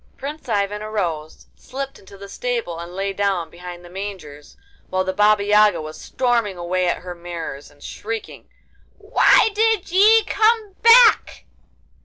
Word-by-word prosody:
Prince 290 -1 -8
Ivan 205 -1 -1
arose, 175 -8 -4
slipped 275 +1 -8
into 195 +1 -16
the 200 0 -10
stable, 225 -6 -4
and 170 +1 -9
lay 195 +1 -3
down 195 -4 -2
behind 175 0 -10
the - - -13
mangers, 185 -7 -9 0.3
while 185 0 0
the 190 0 -3
Baba 210 +1 +3
Yaga 210 -3 +4
was 155 0 -9
storming 235 -6 -1
away 180 +1 -1
at 175 - -2
her 180 -1 -7
mares 170 -5 -8
and 145 0 -20
shrieking: 225 +1 -7 0.5
'Why 445 - +3
did 440 -4 0
ye 430 +4 +5
come 435 -2 +1
back? 465 0 +5
200 Hz, 150 wpm, -20 LUFS, 175-250 Hz, 0.5 s, ye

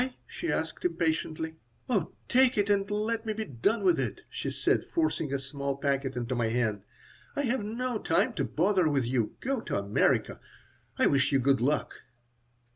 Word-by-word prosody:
she 345 - -4
asked, 160 +1 -2
impatiently. 160 -2 -1 0.3
"Oh, 205 -10 0
take 255 -1 +4
it 205 0 +2
and 200 0 +2
let 215 +2 -1
me 220 -1 -2
be 220 +1 -3
done 140 - 0
with 360 -3 +4
it," - - -2
she - - -3
said, - - +1
forcing 315 - -1
a 140 - +1
small 140 0 -4
packet 140 -1 -1
into 120 +1 -2
my 120 -2 +1
hand. 110 -3 0 0.5
"I 285 - 0
have 245 -3 0
no 235 +2 -2
time 170 +9 +1
to 160 -10 -1
bother 180 +3 +2
with 140 -4 +1
you. 120 -3 0
Go 265 -2 -1
to - - -2
America. 100 +1 +1 0.6
I - - +4
wish 140 0 +3
you 135 - +4
good 135 -1 +3
luck." 145 +4 +1
160 Hz, 180 wpm, -29 LUFS, 135-220 Hz, 0.6 s, take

